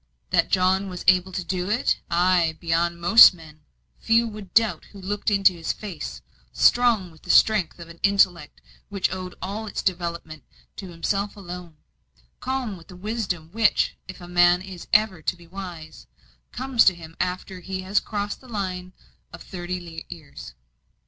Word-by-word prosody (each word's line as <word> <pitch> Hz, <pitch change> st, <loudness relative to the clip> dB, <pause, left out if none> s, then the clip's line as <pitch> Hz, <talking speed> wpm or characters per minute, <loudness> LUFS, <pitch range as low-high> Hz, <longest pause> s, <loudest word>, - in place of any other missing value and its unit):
That -, -, +2 dB
John 190 Hz, +1 st, +2 dB
was 180 Hz, -1 st, -7 dB
able 185 Hz, 0 st, +4 dB
to 185 Hz, 0 st, -3 dB
do 180 Hz, +2 st, -3 dB
it 230 Hz, +5 st, +1 dB
ay, 175 Hz, -2 st, +2 dB
beyond 170 Hz, 0 st, 0 dB
most 195 Hz, +3 st, +8 dB
men 155 Hz, -2 st, -15 dB, 0.4 s
few 230 Hz, +1 st, +3 dB
would 210 Hz, -4 st, -9 dB
doubt 225 Hz, -1 st, +2 dB
who 200 Hz, -, -14 dB
looked 205 Hz, +3 st, -2 dB
into 195 Hz, -2 st, +4 dB
his 165 Hz, -2 st, -3 dB
face; 200 Hz, -7 st, -7 dB, 0.3 s
strong 230 Hz, -7 st, +3 dB
with 160 Hz, -, -19 dB
the -, -, -16 dB
strength 210 Hz, -7 st, +4 dB
of 170 Hz, -1 st, -10 dB
an 170 Hz, 0 st, -13 dB
intellect 195 Hz, -3 st, +2 dB, 0.3 s
which 200 Hz, -2 st, -1 dB
owed 185 Hz, -1 st, -6 dB
all 210 Hz, +4 st, -4 dB
its -, -, -4 dB
development 170 Hz, -4 st, -3 dB, 0.3 s
to 195 Hz, -, -7 dB
himself 200 Hz, +5 st, -2 dB
alone; 180 Hz, -4 st, -9 dB, 0.6 s
calm 255 Hz, -6 st, -3 dB
with 165 Hz, -, -16 dB
the 180 Hz, -, -12 dB
wisdom 185 Hz, -5 st, -4 dB
which, 225 Hz, +1 st, +2 dB
if 185 Hz, -, -9 dB
a 175 Hz, -, -10 dB
man 175 Hz, 0 st, +4 dB
is 190 Hz, -3 st, -10 dB
ever 215 Hz, -5 st, +3 dB
to 180 Hz, -, -1 dB
be 175 Hz, -1 st, -17 dB
wise, 175 Hz, -3 st, -9 dB, 0.4 s
comes 255 Hz, -2 st, +2 dB
to 185 Hz, -, +5 dB
him 165 Hz, -1 st, -12 dB
after 185 Hz, +1 st, -3 dB
he 190 Hz, +1 st, -5 dB
has 195 Hz, +3 st, +2 dB
crossed 205 Hz, -1 st, -4 dB
the 260 Hz, -, -16 dB
line 185 Hz, -4 st, -4 dB, 0.4 s
of -, -, -11 dB
thirty 175 Hz, -2 st, -6 dB
years. 150 Hz, -, -11 dB
185 Hz, 170 wpm, -24 LUFS, 175-205 Hz, 0.6 s, most